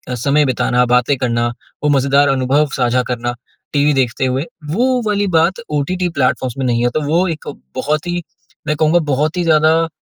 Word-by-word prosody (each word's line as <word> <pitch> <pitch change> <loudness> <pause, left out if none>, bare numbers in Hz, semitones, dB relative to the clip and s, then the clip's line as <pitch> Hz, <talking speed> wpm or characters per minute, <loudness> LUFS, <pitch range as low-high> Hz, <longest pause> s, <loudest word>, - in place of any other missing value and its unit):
समय 140 +5 +2
बिताना, 125 -1 +1
बातें 125 +3 +2
करना 120 -2 0 0.4
वो 150 - +2
मज़ेदार 140 0 +3
अनुभव 135 +3 +2
साझा 125 0 +1
करना, 120 0 -3 0.4
टीवी 145 0 +3
देखते 130 -1 0
हुए। 130 +3 -1 0.3
वो 250 +7 +1
वाली 205 -1 +1
बात 170 +6 +2 0.2
ओटीटी 180 +5 -1
प्लैटफ़ॉर्म्स 130 -2 0
में 135 - -2
नहीं 120 -1 +1
है, 120 - +3
तो 155 - -2
वो 165 +6 +1
एक 160 -3 -5 0.3
बहुत 150 +3 -1
ही 175 0 -2 0.5
मैं 150 - +1
कहूँगा 160 +2 +3
बहुत 150 +6 0
ही 175 - +1
ज़्यादा, 160 0 +3
145 Hz, 180 wpm, -17 LUFS, 125-160 Hz, 0.5 s, मज़ेदार